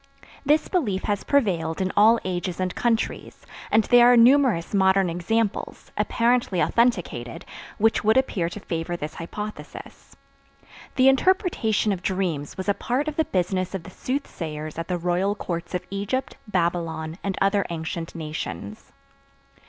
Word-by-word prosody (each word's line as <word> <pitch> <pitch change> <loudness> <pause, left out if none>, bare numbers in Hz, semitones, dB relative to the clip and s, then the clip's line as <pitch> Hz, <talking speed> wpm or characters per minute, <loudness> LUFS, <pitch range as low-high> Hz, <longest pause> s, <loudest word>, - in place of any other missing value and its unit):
This 300 +2 +2
belief 215 - -1
has 205 -1 -1
prevailed 175 - +1
in 190 0 0
all 220 +3 +6
ages 180 -1 -3
and 185 -1 -1
countries, 230 -2 -2 0.2
and 220 +1 +4
there 245 +2 +6
are 245 - +6
numerous 235 -8 +4
modern 190 -2 +3
examples, 205 +5 -2
apparently 235 -5 +1
authenticated, 175 - 0 0.3
which 225 +1 +2
would 220 +3 +4
appear 190 -10 +1
to 210 - -8
favor 175 -2 -4
this 150 -1 -5
hypothesis. 210 +5 -8 0.8
The 260 0 +5
interpretation 270 - +2
of 190 -3 -2
dreams 180 -7 -2
was 190 - -5
a 200 - +3
part 250 +8 -2
of 305 - -3
the 320 - +1
business 185 -1 -1
of 185 - -5
the 185 - -11
soothsayers 160 - -5
at 165 - -4
the 180 - -1
royal 180 +4 0
courts 175 -2 -4
of 180 0 -3
Egypt, 200 +7 -2
Babylon 170 -3 -2
and 195 -1 -2
other 195 +1 +2
ancient 165 +1 -5
nations. 130 - -6
190 Hz, 145 wpm, -24 LUFS, 170-230 Hz, 0.8 s, all